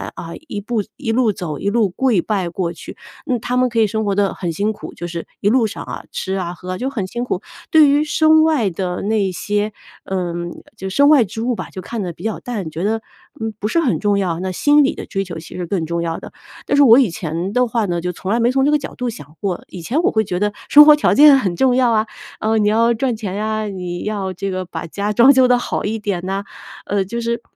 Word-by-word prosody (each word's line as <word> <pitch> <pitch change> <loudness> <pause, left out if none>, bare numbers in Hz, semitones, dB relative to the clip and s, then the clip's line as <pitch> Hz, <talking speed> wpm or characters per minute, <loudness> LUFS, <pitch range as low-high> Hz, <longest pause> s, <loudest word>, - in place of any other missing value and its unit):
啊， 165 - -7 0.2
一 - - -3
步 220 +1 -2
一 265 -5 -2
路 235 -2 +3
走 160 -6 -5
一 200 - -1
路 215 -1 +2
跪 215 0 +1
拜 190 -2 -1
过 170 0 -3
去， - - -10 0.3
那 255 - 0
他 245 +3 -3
们 255 0 +3
可 230 -1 -1
以 220 - +4
生 220 +2 -2
活 200 - +1
得 200 -1 +1
很 175 -3 -3
辛 205 +6 -1
苦， - - -9
就 175 - -6
是 170 -1 -5 0.2
一 - - +1
路 240 +1 +3
上 215 - -7
啊， - - -7
吃 190 - -3
啊， 180 -2 -3
喝， 185 +1 -6
就 255 +5 -2
很 230 -9 -3
辛 240 +5 -4
苦。 205 -6 -2 0.3
对 310 -4 +7
于 290 +2 +3
身 315 +1 +4
外 300 -10 +2
的 180 0 -3
那 205 -2 +1
些 205 +3 -2 0.3
嗯， 175 -2 -3 0.3
就 190 - -5
身 280 +9 +4
外 295 -5 +6
之 220 +2 -6
物 245 +1 0
吧， - - -6
就 185 - -7
看 225 +4 -5
得 180 -3 -3
比 - - -13
较 220 - -2
淡， 210 -9 -4
觉 160 +3 -5
得， 220 +2 0 0.4
嗯， 220 -1 -3
不 210 - -1
是 335 - +2
很 290 -8 +1
重 205 -1 +1
要， 175 -4 -1
那 185 0 -2
心 290 +10 +4
理 275 - +1
的 - - -7
追 195 -1 -2
求 175 -4 -7
其 160 - -11
实 180 - -4
更 170 -1 -2
重 170 +1 -2
要 165 -1 -2
的。 - - -11 0.3
但 - - +1
是 285 - +7
我 240 -1 +8
以 255 -7 +3
前 170 +1 -4
的 250 +1 +3
话 230 -1 0
呢， 175 -3 -2
就 180 +1 -2
从 185 +2 -7
来 230 - +2
没 235 +2 +3
从 270 +1 +2
这 295 - +3
个 300 - +4
角 280 - -8
度 250 -1 -2
想 150 - -10
过， 190 -4 -2
以 180 - -8
前 255 - 0
我 - - +2
会 220 - +2
觉 180 -3 -3
得 210 +1 0 0.2
生 295 0 +9
活 300 0 +8
条 300 - +2
件 290 -1 +8
很 190 -9 -1
重 255 +4 +3
要 250 -2 +3
啊， 220 0 +1 0.3
呃， 220 +1 +1
你 210 -1 +2
要 230 +3 +3
赚 245 +1 -1
钱 205 -4 -5
呀， 215 +1 -2
你 180 -3 -5
要 200 -3 -3
这 195 +2 -4
个 185 0 -3
把 175 - -6
家 205 +5 -2
装 245 +6 +7
修 260 -1 +5
得 250 0 +4
好 245 - -3
一 220 +2 -2
点 200 -4 -2
呐， 195 +1 -2 0.4
呃， 200 -1 0
就 235 +5 -4
是 235 0 -2
210 Hz, 285 characters per minute, -19 LUFS, 185-245 Hz, 0.4 s, 生